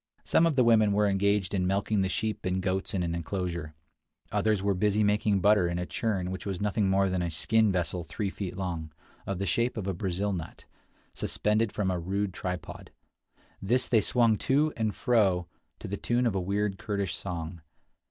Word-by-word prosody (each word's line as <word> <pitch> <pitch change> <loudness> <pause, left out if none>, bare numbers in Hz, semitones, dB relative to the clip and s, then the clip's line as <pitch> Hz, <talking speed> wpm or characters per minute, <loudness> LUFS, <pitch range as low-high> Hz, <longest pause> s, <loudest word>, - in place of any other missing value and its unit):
Some 165 - +3
of 160 - 0
the 130 - +4
women 110 -3 +4
were 105 +1 +3
engaged 100 0 +1
in 90 -2 +1
milking 100 +2 +1
the 95 - 0
sheep 110 +2 -2
and 95 0 0
goats 95 +1 -2
in 90 - 0
an 85 -1 -2
inclosure. 85 -2 -4 0.6
Others 105 -3 +1
were 100 0 +2
busy 105 +2 +2
making 105 -1 +2
butter 100 -2 +4
in 85 0 -2
a 90 - -2
churn 95 -3 -2
which 95 - -5
was 95 -3 -4
nothing 105 -1 +1
more 95 0 +3
than 90 -1 -1
a 85 - -1
skin 110 +7 +2
vessel 90 -1 -1
three 95 +6 -3
feet 95 -3 -5
long, 85 -5 -4 0.4
of 100 - -2
the 100 - -2
shape 120 +7 0
of 105 - -3
a 95 - -1
Brazil 95 +2 -2
nut, 85 -4 -7 0.5
suspended 105 0 0
from 100 -3 -1
a 90 - -1
rude 95 +3 -2
tripod; 90 -2 -6 0.7
this 120 +6 +1
they 115 -3 +4
swung 115 0 +3
to 150 +3 +2
and 110 -3 -1
fro 100 -7 +2 0.3
to - - -8
the 100 - -3
tune 120 +1 0
of 115 - +2
a 95 - -1
weird 100 +1 -1
Kurdish 100 0 -2
song. 85 -2 -5
100 Hz, 200 wpm, -28 LUFS, 90-105 Hz, 0.7 s, the